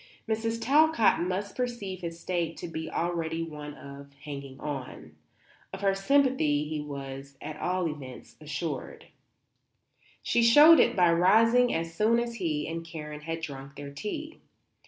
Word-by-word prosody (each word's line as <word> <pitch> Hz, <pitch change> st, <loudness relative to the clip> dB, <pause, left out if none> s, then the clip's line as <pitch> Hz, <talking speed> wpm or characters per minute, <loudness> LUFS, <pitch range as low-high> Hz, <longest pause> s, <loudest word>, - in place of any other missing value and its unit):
Mrs. 225 Hz, +1 st, -1 dB
Talcott 290 Hz, -, +4 dB
must 185 Hz, +3 st, -2 dB
perceive 235 Hz, -7 st, -4 dB
his 170 Hz, -1 st, -6 dB
state 170 Hz, -2 st, -2 dB
to 175 Hz, -, -6 dB
be 160 Hz, -1 st, -5 dB
already 165 Hz, -1 st, -2 dB
one 150 Hz, -2 st, -8 dB
of 140 Hz, 0 st, -11 dB
"hanging 140 Hz, -2 st, -7 dB
on." 130 Hz, -, -6 dB, 0.6 s
Of 190 Hz, -, -7 dB
her 195 Hz, -1 st, +3 dB
sympathy 195 Hz, -, +2 dB
he 155 Hz, -1 st, -3 dB
was, 140 Hz, -1 st, -8 dB
at 155 Hz, -, -7 dB
all 180 Hz, 0 st, 0 dB
events, 140 Hz, -5 st, -8 dB
assured. 150 Hz, 0 st, -5 dB, 1.2 s
She 235 Hz, -, +2 dB
showed 295 Hz, +8 st, +8 dB
it -, -, +4 dB
by 175 Hz, -2 st, +4 dB
rising 230 Hz, +8 st, +5 dB
as 165 Hz, 0 st, -2 dB
soon 215 Hz, +6 st, +3 dB
as 235 Hz, 0 st, -3 dB
he 155 Hz, -6 st, -2 dB
and 165 Hz, +1 st, -4 dB
Karen 150 Hz, -2 st, -8 dB
had 165 Hz, +1 st, -4 dB
drunk 140 Hz, -3 st, -7 dB
their 145 Hz, -1 st, -8 dB
tea. 300 Hz, -, -6 dB
165 Hz, 150 wpm, -28 LUFS, 150-215 Hz, 1.2 s, showed